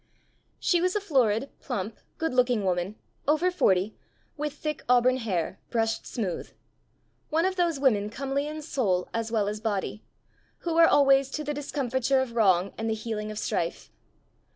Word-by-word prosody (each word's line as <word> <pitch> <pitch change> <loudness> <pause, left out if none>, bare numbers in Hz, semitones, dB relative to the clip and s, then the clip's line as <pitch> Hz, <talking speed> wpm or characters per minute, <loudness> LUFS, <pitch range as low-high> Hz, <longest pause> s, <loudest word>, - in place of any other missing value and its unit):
She 350 -2 +2
was 365 +2 +1
a - - +3
florid, 265 - +1
plump, 205 +3 -4 0.2
good 325 -4 -1
looking 245 -4 +2
woman, 180 +2 0 0.3
over 315 +5 +3
forty, 195 - +2 0.4
with 300 -1 -3
thick 300 0 -4
auburn 250 +1 +5
hair, 190 -7 -2
brushed 225 -1 0
smooth 195 -7 -3 0.8
one 325 +3 +2
of 375 0 0
those 340 -5 +1
women 215 -7 +2
comely 275 +4 -2
in 305 0 -6
soul 200 - 0
as 230 0 -2
well 215 -3 +1
as 210 +1 -3
body, 210 -1 -2 0.6
who 335 -1 0
are 330 - +8
always 275 -1 +5
to 305 +2 -4
the 295 0 -2
discomfiture 270 -2 0
of 260 -2 -1
wrong 195 -4 +3
and 225 0 -1
the 220 - +1
healing 215 -1 -4
of 215 - -6
strife. - - -2
250 Hz, 165 wpm, -27 LUFS, 210-290 Hz, 0.8 s, are